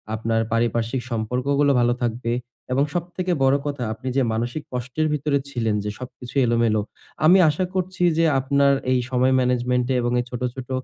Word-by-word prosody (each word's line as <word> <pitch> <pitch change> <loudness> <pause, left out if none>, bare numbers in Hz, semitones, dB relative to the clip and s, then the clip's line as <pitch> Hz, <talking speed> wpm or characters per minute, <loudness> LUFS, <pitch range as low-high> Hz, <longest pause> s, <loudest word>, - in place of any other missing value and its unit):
আপনার 115 +1 0
পারিপার্শ্বিক 115 +2 0
সম্পর্কগুলো 130 +6 +1
ভালো 120 0 +3
থাকবে। 115 0 -1 0.4
এবং 135 +2 +3
সবথেকে 180 +1 -3
বড় 135 +1 +4
কথা, 140 -4 -3
আপনি 130 +4 -9
যে 135 - +4
মানসিক 120 +7 -3
কষ্টের 130 +6 -2
ভিতরে 145 -1 0
ছিলেন, 115 -5 -1
যে 105 - -3
সবকিছু 125 0 -10
এলোমেলো। 115 -2 +2 0.4
আমি 180 +4 +7
আশা 170 +5 0
করছি 185 -1 -2
যে 165 - +4
আপনার 140 +1 +3 0.2
এই 130 - +3
সময় 130 +1 +2
ম্যানেজমেন্ট 125 0 +1
এ - - 0
এবং 120 0 -1
এই 120 - -2
ছোট, 125 -1 -6
ছোট 130 -1 -8
125 Hz, 170 wpm, -23 LUFS, 120-140 Hz, 0.4 s, আমি